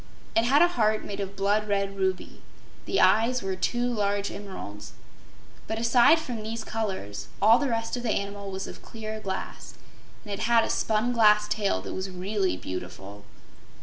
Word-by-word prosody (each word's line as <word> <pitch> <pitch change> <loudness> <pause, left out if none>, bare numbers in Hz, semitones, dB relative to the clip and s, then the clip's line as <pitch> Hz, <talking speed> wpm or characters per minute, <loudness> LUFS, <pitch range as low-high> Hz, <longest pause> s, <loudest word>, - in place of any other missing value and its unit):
It 225 - +4
had 280 +6 +5
a - - +6
heart 215 -10 +1
made 205 - -6
of 200 0 -4
blood 205 +2 +1
red 195 -1 0
ruby. 190 -1 -2 0.4
The - - 0
eyes 225 +6 +4
were 190 -1 -2
two 240 +6 0
large 205 -4 0
emeralds. 185 - -8 0.7
But, 220 - -3
aside 235 +7 +5
from 250 -8 -5
these 220 +1 -4
colors, 190 - -4
all 220 +4 +6
the 285 -2 0
rest 225 0 -1
of - - -4
the 240 - -2
animal 200 -1 -2
was 190 0 -4
of - - -9
clear 220 -1 -7
glass, 190 -2 -6 0.5
and 205 - -6
it 200 - -4
had 230 -1 +4
a - - -1
spun 220 +3 +1
glass 210 -2 +5
tail 200 - 0
that - - -6
was 190 +1 -4
really 190 - -1
beautiful. 95 +3 -7
210 Hz, 180 wpm, -27 LUFS, 195-225 Hz, 0.7 s, a